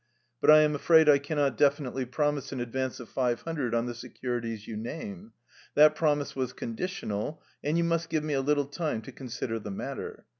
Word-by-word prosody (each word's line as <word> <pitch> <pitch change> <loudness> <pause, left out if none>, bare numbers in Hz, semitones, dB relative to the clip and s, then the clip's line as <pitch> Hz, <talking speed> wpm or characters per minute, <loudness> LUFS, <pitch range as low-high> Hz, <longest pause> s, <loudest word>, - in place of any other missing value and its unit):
But - - +3
I 155 0 +10
am 150 0 +3
afraid 160 +2 +5
I 145 -2 +7
cannot 145 -1 0
definitely 140 -3 +2
promise 145 +3 -1
an 130 - -4
advance 130 +2 -3
of 120 - -8
five 120 -1 0
hundred 145 -8 -2
on 115 0 +1
the 120 - -3
securities 120 -2 -5
you 110 - -5
name. 180 - -6 0.4
That 150 +1 +7
promise 150 -2 +1
was 130 -2 -2
conditional, 115 - -4 0.2
and 150 +3 +1
you 170 - +2
must 170 0 0
give 155 -2 0
me 155 -1 -2
a 135 - +2
little 145 +1 +2
time 145 -5 -3
to - - -9
consider 120 -3 -4
the 105 - -7
matter. 95 - -6
140 Hz, 195 wpm, -29 LUFS, 120-155 Hz, 0.4 s, I